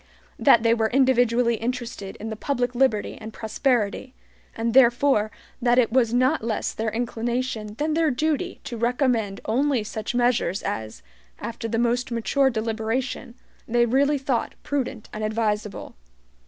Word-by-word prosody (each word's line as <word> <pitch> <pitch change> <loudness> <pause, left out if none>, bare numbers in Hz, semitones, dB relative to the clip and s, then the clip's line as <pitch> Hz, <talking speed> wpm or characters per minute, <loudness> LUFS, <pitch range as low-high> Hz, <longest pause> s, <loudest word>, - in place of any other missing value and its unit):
That 235 -5 +5
they 230 0 +4
were 220 -1 +1
individually 245 -2 +3
interested 235 -4 -4
in 220 +1 -6
the - - -3
public 245 +1 -1
liberty 240 -5 +1
and 220 0 -7
prosperity, 235 +2 -1 0.4
and 225 0 -1
therefore 245 -3 +4 0.3
that 240 0 +3
it 240 -3 +3
was 235 -2 +3
not 255 +3 +2
less 225 -2 -2
their 220 0 -2
inclination 235 -1 -3
than 305 +5 -1
their 325 0 +2
duty 310 +6 -1
to 250 -4 -6
recommend 235 -4 0
only 255 +1 +1
such 215 +2 -5
measures 240 -6 +1
as, 110 - -5 0.3
after 230 0 -5
the 225 0 -1
most 240 +2 +1
mature 260 +4 +2
deliberation, 230 +2 -3 0.3
they 240 +1 +3
really 280 +5 +2
thought 265 -3 -2
prudent 270 -5 -3
and 215 - -4
advisable. 215 -1 -2
235 Hz, 145 wpm, -24 LUFS, 220-260 Hz, 0.4 s, That